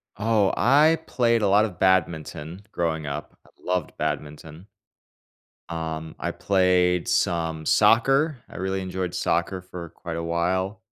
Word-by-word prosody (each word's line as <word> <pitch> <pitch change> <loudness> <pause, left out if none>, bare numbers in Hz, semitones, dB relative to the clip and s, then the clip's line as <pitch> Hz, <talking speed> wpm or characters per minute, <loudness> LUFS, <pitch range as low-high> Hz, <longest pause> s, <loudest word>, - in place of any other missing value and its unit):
Oh, 105 -2 +2
I 150 +6 +4
played 115 -2 +2
a 105 - +2
lot 105 +2 +5
of 90 -5 -8
badminton 85 -1 0
growing 80 -2 -2
up. 70 0 -6
I - - -21
loved 90 -3 -2
badminton. 75 +4 -5 1.0
Um, 80 -1 -5
I - - -2
played 90 -2 +2
some 80 -2 0
soccer. 135 - +4
I - - -14
really 95 0 -2
enjoyed 95 -1 -4
soccer 90 +1 -1
for 90 -2 -9
quite 85 +1 -7
a 85 - -3
while, 95 +5 -1
90 Hz, 135 wpm, -24 LUFS, 85-100 Hz, 1.0 s, lot